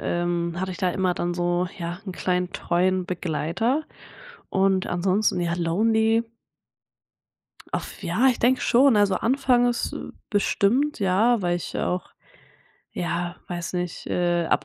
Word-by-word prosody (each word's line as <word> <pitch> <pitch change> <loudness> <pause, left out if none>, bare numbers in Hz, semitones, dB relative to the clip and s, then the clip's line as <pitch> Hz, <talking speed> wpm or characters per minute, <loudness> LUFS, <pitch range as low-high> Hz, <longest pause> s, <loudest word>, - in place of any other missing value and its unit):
ähm, 175 0 -1
hatte 190 0 -2
ich - - -9
da 180 -1 +1
immer 185 0 0
dann 175 0 -2
so 175 +1 0
ja, 175 +2 -5
'n 190 - -4
kleinen 180 0 -1
treuen 185 +1 +1
Begleiter 180 - -1 0.7
und 190 -1 +2
ansonsten, 185 +2 +1
ja 170 0 0
lonely? 220 +6 +2 1.5
Auf - - -5
ja, 265 - +2
ich 250 - +1
denke 255 +2 +3
schon. 255 -1 +4
Also, 205 -2 +3
anfangs, 245 -1 +1
äh, - - -6 0.2
bestimmt, 220 +8 +1
ja, 205 +4 +3
weil 175 -1 0
ich 175 - -6
ja - - -1
auch 180 0 -3 0.8
ja, 175 0 -3
weiß 175 0 -5
nicht, 180 -1 -4
äh, 175 -1 +1
ab - - +1
185 Hz, 145 wpm, -24 LUFS, 175-220 Hz, 1.5 s, schon